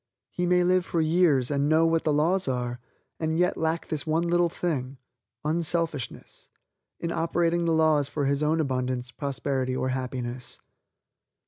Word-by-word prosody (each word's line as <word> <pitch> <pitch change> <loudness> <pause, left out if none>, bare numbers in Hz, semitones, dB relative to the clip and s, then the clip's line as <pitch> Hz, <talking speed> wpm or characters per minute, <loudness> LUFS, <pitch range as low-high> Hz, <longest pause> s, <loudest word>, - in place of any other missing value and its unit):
He 180 0 -1
may 180 0 +4
live 180 0 +3
for 170 - -2
years, 155 -5 +3
and 140 0 +1
know 160 +1 +4
what 165 0 +2
the 155 - 0
laws 165 +5 +2
are, 125 -2 -2 0.4
and 160 0 -1
yet 180 +1 +2
lack 160 +1 -2
this 155 0 -2
one 160 +2 +1
little 175 0 +2
thing, 140 -7 -3 0.5
unselfishness, 165 -4 -2 0.5
in 170 - -3
operating 170 +1 +1
the 165 - +2
laws 155 -3 +3
for 145 -1 -2
his 140 +1 +1
own 155 +2 +2
abundance, 130 -3 -1
prosperity 135 -2 -2
or 130 - -1
happiness. 125 -1 -3
155 Hz, 155 wpm, -26 LUFS, 130-170 Hz, 0.5 s, may